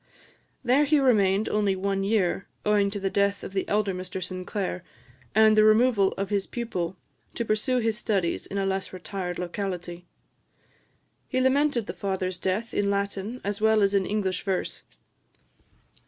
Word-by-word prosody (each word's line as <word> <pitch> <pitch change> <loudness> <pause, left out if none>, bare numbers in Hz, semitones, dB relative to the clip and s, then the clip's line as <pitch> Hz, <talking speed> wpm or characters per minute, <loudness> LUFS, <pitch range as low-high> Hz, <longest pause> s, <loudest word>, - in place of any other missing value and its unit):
There 260 +4 +4
he 300 +1 +3
remained 210 -6 +3
only 205 -2 +1
one 195 +1 -1
year, 195 -3 +1 0.2
owing 205 -1 +3
to 205 +1 -4
the 195 -1 -1
death 200 0 +1
of - - -7
the 190 - -2
elder 205 -1 +1
Mr 185 0 -5
Sinclair, 185 0 -4 0.5
and 220 0 +6
the 215 - +6
removal 215 -2 +4
of 195 +1 -4
his 200 -2 0
pupil 185 -7 -3 0.4
to 235 - -2
pursue 215 +4 +1
his 225 -2 0
studies 190 -7 -1
in 200 - -5
a 195 - 0
less 195 0 -2
retired 185 -1 -5
locality. 180 -1 -5 1.2
He 255 - -1
lamented 260 -2 +2
the - - -5
father's 185 -2 -3
death 195 +5 -2
in 200 -1 +1
Latin, 200 +3 -2
as 205 +1 -3
well 220 -1 +4
as 200 0 +2
in 195 -2 +2
English 200 -3 -1
verse. 190 -2 -2
200 Hz, 160 wpm, -26 LUFS, 190-215 Hz, 1.2 s, and